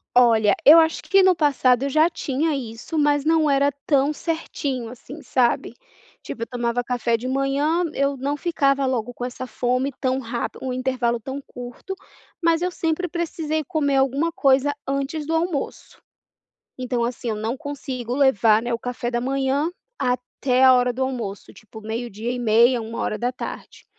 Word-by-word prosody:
Olha, 230 Hz, -4 st, +5 dB
eu 310 Hz, +4 st, +10 dB
acho 320 Hz, 0 st, +3 dB
que 390 Hz, -1 st, +4 dB
no 375 Hz, -1 st, +6 dB
passado 270 Hz, -5 st, +2 dB
eu 280 Hz, -, 0 dB
já 315 Hz, +4 st, +4 dB
tinha 310 Hz, -1 st, -1 dB
isso, 245 Hz, +4 st, -5 dB
mas 290 Hz, -1 st, +2 dB
não 315 Hz, -1 st, +3 dB
era 280 Hz, +1 st, +3 dB
tão 285 Hz, 0 st, +3 dB
certinho, 285 Hz, -6 st, -3 dB
assim, 270 Hz, +5 st, -11 dB
sabe, 240 Hz, -2 st, +1 dB, 0.5 s
tipo 230 Hz, -, -8 dB
eu -, -, -5 dB
tomava 240 Hz, -1 st, -1 dB
café 240 Hz, -1 st, 0 dB
de 250 Hz, +3 st, -4 dB
manhã. 280 Hz, +6 st, +1 dB
Eu 275 Hz, 0 st, 0 dB
não 280 Hz, +3 st, -2 dB
ficava 275 Hz, -4 st, +1 dB
logo 245 Hz, -2 st, -2 dB
com 245 Hz, -, -7 dB
essa 250 Hz, +1 st, -5 dB
fome 255 Hz, +3 st, 0 dB
tão 260 Hz, 0 st, +1 dB
rap 235 Hz, -1 st, -4 dB
um 255 Hz, -1 st, -3 dB
intervalo 255 Hz, -2 st, 0 dB
tão 265 Hz, +5 st, -6 dB
curto, 245 Hz, +10 st, -8 dB, 0.5 s
mas 330 Hz, 0 st, +3 dB
eu 360 Hz, -, +1 dB
sempre 335 Hz, +2 st, -1 dB
precisei 315 Hz, -2 st, -2 dB
comer 285 Hz, -3 st, 0 dB
alguma 275 Hz, +5 st, +1 dB
coisa 275 Hz, 0 st, +3 dB
antes 275 Hz, +3 st, -2 dB
do 325 Hz, -, -2 dB
almoço. 325 Hz, -3 st, -3 dB, 0.8 s
Então, 245 Hz, -2 st, -1 dB
assim, 240 Hz, 0 st, -3 dB
eu 215 Hz, -, -1 dB
não 220 Hz, +4 st, -2 dB
consigo 265 Hz, -4 st, -5 dB
levar, 225 Hz, -6 st, +4 dB
né, 240 Hz, 0 st, -2 dB
o 230 Hz, -, -2 dB
café 245 Hz, -1 st, -4 dB
da 240 Hz, 0 st, -1 dB
manhã 275 Hz, +4 st, 0 dB, 0.3 s
até 250 Hz, +1 st, 0 dB
a 260 Hz, 0 st, +8 dB
hora 250 Hz, 0 st, +3 dB
do 260 Hz, +2 st, -2 dB
almoço, 230 Hz, -7 st, -5 dB
tipo 220 Hz, +1 st, -13 dB
12h30, 235 Hz, +2 st, +1 dB
13h00. 230 Hz, +2 st, -5 dB
265 Hz, 165 wpm, -23 LUFS, 245-290 Hz, 0.8 s, eu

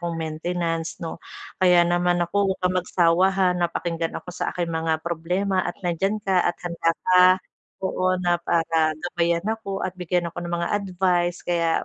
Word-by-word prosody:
kong 170 Hz, -1 st, -3 dB
maintenance 165 Hz, +1 st, -3 dB
'no. 165 Hz, 0 st, -7 dB, 0.4 s
Kaya 175 Hz, -1 st, +6 dB
naman 175 Hz, 0 st, +2 dB
naku, 195 Hz, +3 st, +1 dB
huwag 190 Hz, -, -2 dB
kang 180 Hz, 0 st, +1 dB
magsawa, 180 Hz, +1 st, +3 dB
ha, 190 Hz, -1 st, +2 dB
na 175 Hz, -1 st, 0 dB
pakinggan 165 Hz, -1 st, -3 dB
ako -, -, -19 dB
sa -, -, -2 dB
aking 175 Hz, -1 st, -1 dB
mga 160 Hz, -1 st, 0 dB
problema 180 Hz, +3 st, 0 dB
at 175 Hz, -, -4 dB
nandiyan 195 Hz, +5 st, 0 dB
ka, 190 Hz, -3 st, +2 dB
at 175 Hz, -, 0 dB
handa 170 Hz, -1 st, 0 dB, 0.2 s
ka 185 Hz, 0 st, +6 dB, 0.6 s
oo, 185 Hz, 0 st, +1 dB
na 175 Hz, -1 st, +1 dB
para 165 Hz, -2 st, +1 dB
gabayan 170 Hz, +1 st, -1 dB
ako 220 Hz, -3 st, -3 dB
at 185 Hz, -, -2 dB
bigyan 180 Hz, -1 st, -1 dB
ako 175 Hz, -, -8 dB
ng 175 Hz, 0 st, -3 dB
mga 170 Hz, 0 st, -2 dB
advice, 180 Hz, -3 st, 0 dB
kaya 170 Hz, -2 st, +1 dB
175 Hz, 175 wpm, -24 LUFS, 170-185 Hz, 0.6 s, Kaya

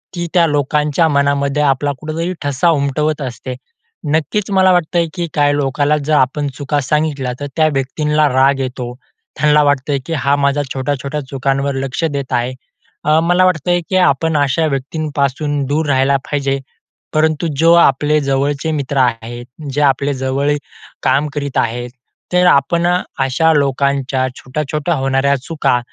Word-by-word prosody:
ती 175 Hz, -1 st, -3 dB
त्या 175 Hz, -2 st, +5 dB
लोकांच्या 150 Hz, +2 st, +1 dB
मनामध्ये 140 Hz, 0 st, +1 dB
आपला 145 Hz, 0 st, +1 dB
कुठेतरी 165 Hz, +3 st, -3 dB
ठसा 145 Hz, +4 st, +1 dB
उमटवत 150 Hz, 0 st, 0 dB
असते. 125 Hz, 0 st, -5 dB, 0.6 s
नक्कीच 185 Hz, +7 st, 0 dB
मला 190 Hz, -1 st, +4 dB
वाटतंय, 175 Hz, -1 st, +1 dB
की 175 Hz, -2 st, -3 dB
काय 145 Hz, -1 st, +2 dB
लोकाला 145 Hz, +1 st, +1 dB
जर 155 Hz, -, 0 dB
आपण 145 Hz, +2 st, +1 dB
चुका 145 Hz, +1 st, -1 dB
सांगितल्या, 145 Hz, -2 st, -1 dB
तर 145 Hz, -, -4 dB
त्या 155 Hz, -1 st, +3 dB
व्यक्तींला 150 Hz, +3 st, +1 dB
राग 135 Hz, +1 st, +3 dB
येतो, 125 Hz, -2 st, -4 dB, 0.5 s
त्यांना 150 Hz, 0 st, +4 dB
वाटतंय 145 Hz, 0 st, +1 dB
की 165 Hz, -, -4 dB
हा 140 Hz, +1 st, +2 dB
माझा 140 Hz, 0 st, +1 dB
छोट्या-छोट्या 140 Hz, +2 st, -3 dB
चुकांवर 135 Hz, +1 st, -1 dB
लक्ष 135 Hz, +3 st, -3 dB
देत 140 Hz, -4 st, -2 dB
आहे. 120 Hz, +2 st, 0 dB, 0.5 s
अ, 155 Hz, +1 st, +3 dB
मला 175 Hz, +2 st, +3 dB
वाटतंय 175 Hz, 0 st, +1 dB
की 190 Hz, -, -1 dB
आपण 160 Hz, -2 st, +2 dB
अशा 145 Hz, +3 st, +1 dB
व्यक्तींपासून, 145 Hz, 0 st, -2 dB
दूर 150 Hz, +4 st, 0 dB
राहायला 135 Hz, 0 st, +2 dB
पाहिजे, 140 Hz, -1 st, -1 dB, 0.5 s
परंतु 155 Hz, +1 st, +1 dB
जो 165 Hz, +1 st, +5 dB
आपले 150 Hz, -2 st, +4 dB
जवळचे 140 Hz, +3 st, -1 dB
मित्र 140 Hz, -2 st, -3 dB
आहेत. 120 Hz, -1 st, -1 dB, 0.3 s
जे 145 Hz, -, 0 dB
आपले 140 Hz, 0 st, +2 dB
जवळ 135 Hz, +2 st, -1 dB, 0.5 s
काम 145 Hz, +2 st, +2 dB
करीत 140 Hz, -2 st, -3 dB
आहेत, 120 Hz, +1 st, -1 dB, 0.4 s
तर 180 Hz, 0 st, +4 dB
आपण 170 Hz, +2 st, +3 dB, 0.3 s
अशा 135 Hz, +5 st, +2 dB
लोकांच्या 140 Hz, -2 st, 0 dB
छोट्या-छोट्या 150 Hz, +4 st, -3 dB
होणाऱ्या 135 Hz, 0 st, +1 dB
चुका, 150 Hz, -6 st, 0 dB
145 Hz, 145 wpm, -16 LUFS, 135-155 Hz, 0.6 s, त्या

